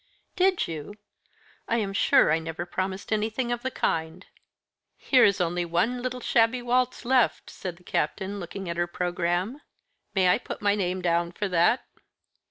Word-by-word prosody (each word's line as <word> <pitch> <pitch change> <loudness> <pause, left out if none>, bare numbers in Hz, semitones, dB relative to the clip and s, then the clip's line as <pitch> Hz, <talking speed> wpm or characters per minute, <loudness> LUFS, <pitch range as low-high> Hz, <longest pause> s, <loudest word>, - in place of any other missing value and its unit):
"Did 375 -1 +2
you? 160 +5 -6 0.7
I 230 - +1
am 200 -3 -1
sure 195 - +4
I 160 - +3
never 165 +1 -5
promised 190 +4 -3
anything 225 +3 -1
of 240 0 -2
the 260 - -2
kind." 165 -5 -2 0.7
"Here 255 -2 +4
is 200 -1 +4
only 175 0 0
one 175 +9 0
little 250 0 -4
shabby 235 +2 +2
waltz 250 0 0
left," 255 -2 +2
said 180 -2 -6
the 175 - -21
Captain, 200 +2 -2
looking 190 +1 -6
at 170 0 -3
her 175 0 +1
programme. 180 +8 -2 0.5
"May 185 -2 +4
I 180 - +4
put - - -7
my 205 -1 +2
name 185 -2 -1
down 170 0 +1
for 205 - -2
that?" 180 +8 +3
195 Hz, 170 wpm, -26 LUFS, 175-240 Hz, 0.7 s, sure